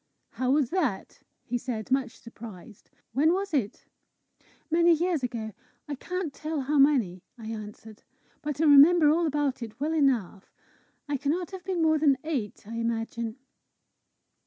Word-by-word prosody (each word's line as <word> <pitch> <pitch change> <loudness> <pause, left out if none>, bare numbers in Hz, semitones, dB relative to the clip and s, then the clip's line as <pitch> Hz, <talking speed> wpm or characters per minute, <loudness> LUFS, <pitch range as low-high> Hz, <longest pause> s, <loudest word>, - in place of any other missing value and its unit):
"How 255 -1 -2
was 275 -2 +2
that?" 300 - -2 0.2
he 245 +1 -2
said, 235 -2 -5
much 260 -2 0
surprised. 220 -3 -12 0.2
"When 305 +7 +3
was 390 -1 -2
it?" 240 -9 -1 0.9
"Many 340 +1 +5
years 335 -1 0
ago 230 -4 -4 0.3
I 295 - -4
cannot 355 +2 -4
tell 310 0 -3
how 285 +2 +1
many," 245 -11 +3 0.2
I 220 -2 -8
answered. 215 0 -9 0.4
"But 295 -1 -4
I - - +2
remember 300 +2 +7
all 335 +1 +2
about 290 -3 -1
it 225 0 -8
well 305 +3 -1
enough. 245 - 0 0.6
I 290 -1 -1
cannot 305 +6 -2
have 380 -2 -8
been 365 -3 0
more 315 -1 +3
than 285 -3 +4
eight, 265 -13 -4
I 230 +1 -6
imagine." 230 0 -3
275 Hz, 155 wpm, -27 LUFS, 230-315 Hz, 0.9 s, remember